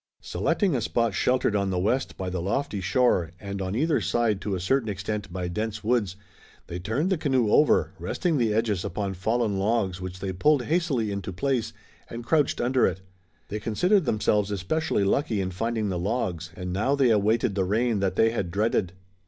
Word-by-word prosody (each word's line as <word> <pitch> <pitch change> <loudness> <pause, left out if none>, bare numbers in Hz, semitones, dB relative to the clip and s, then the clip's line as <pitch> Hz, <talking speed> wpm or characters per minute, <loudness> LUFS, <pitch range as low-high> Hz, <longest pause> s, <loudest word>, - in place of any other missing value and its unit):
Selecting 195 -8 0
a 120 - 0
spot 115 -1 0
sheltered 125 0 +1
on 100 -1 +1
the 95 - -1
west 110 +9 0
by 95 - -4
the 90 -1 -3
lofty 100 +2 -2
shore 95 - +2
and 100 -1 -5
on 95 +1 -3
either 155 +6 +1
side 110 -4 0
to 100 0 -2
a - - -3
certain 115 +5 +1
extent 100 0 -4
by 90 0 -3
dense 105 +4 -3
woods, 110 -5 +1 0.5
they 85 0 -6
turned 120 - -1
the 185 - +1
canoe 130 -8 +1
over, 150 - +4
resting 165 -6 -1
the 115 -3 +2
edges 105 -4 0
upon 100 +2 -3
fallen 105 +2 0
logs 100 -3 0
which 95 0 -6
they 95 0 -3
pulled 145 +7 +3
hastily 145 - 0
into 100 -1 -4
place, 120 +6 -1 0.4
and 115 0 -7
crouched 150 +1 +2
under 125 +1 +3
it. 95 0 -3 0.5
They 105 - -3
considered 180 - +2
themselves 105 -3 +1
especially 105 - 0
lucky 110 +1 +1
in 95 -1 -2
finding 110 +2 -2
the 90 -2 -2
logs, 90 -5 -2
and 90 -1 -5
now 120 +9 +1
they 135 -4 +3
awaited 110 +2 +2
the 95 -1 0
rain 110 +3 +1
that 95 -2 0
they 110 +2 +4
had 100 -6 -2
dreaded. 100 -1 0
105 Hz, 195 wpm, -26 LUFS, 95-125 Hz, 0.5 s, over